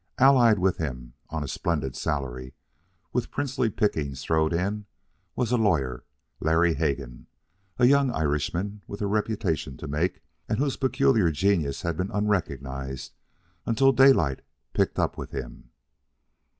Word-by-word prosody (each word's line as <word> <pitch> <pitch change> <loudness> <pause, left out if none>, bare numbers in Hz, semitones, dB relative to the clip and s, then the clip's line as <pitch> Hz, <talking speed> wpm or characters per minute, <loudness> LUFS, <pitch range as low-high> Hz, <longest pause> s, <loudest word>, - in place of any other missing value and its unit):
Allied 125 -5 +6
with 95 0 +1
him, 60 -6 -5 0.2
on 75 -2 -3
a - - -5
splendid 70 -3 -2
salary, 65 -4 -3 0.6
with - - -1
princely 135 -4 -1
pickings 75 -10 -1
thrown 80 -1 +2
in, 100 +5 -1 0.5
was 120 -2 -1
a 125 - +3
lawyer, 80 - +1 0.4
Larry 80 +2 +3
Hegan, 70 -5 -3 0.5
a 125 - +4
young 140 +1 +5
Irishman 85 - -1
with 100 +1 -5
a - - +1
reputation 100 - -1
to - - -7
make, 80 +6 -1 0.3
and - - 0
whose 140 0 0
peculiar 130 -7 +3
genius 80 -3 0
had 85 -2 -2
been 90 +2 -1
unrecognized 70 -10 -2 0.5
until 135 +4 +4
Daylight 125 - +4 0.3
picked - - +1
up - - 0
with - - -6
him. - - -7
85 Hz, 135 wpm, -26 LUFS, 70-110 Hz, 0.6 s, Allied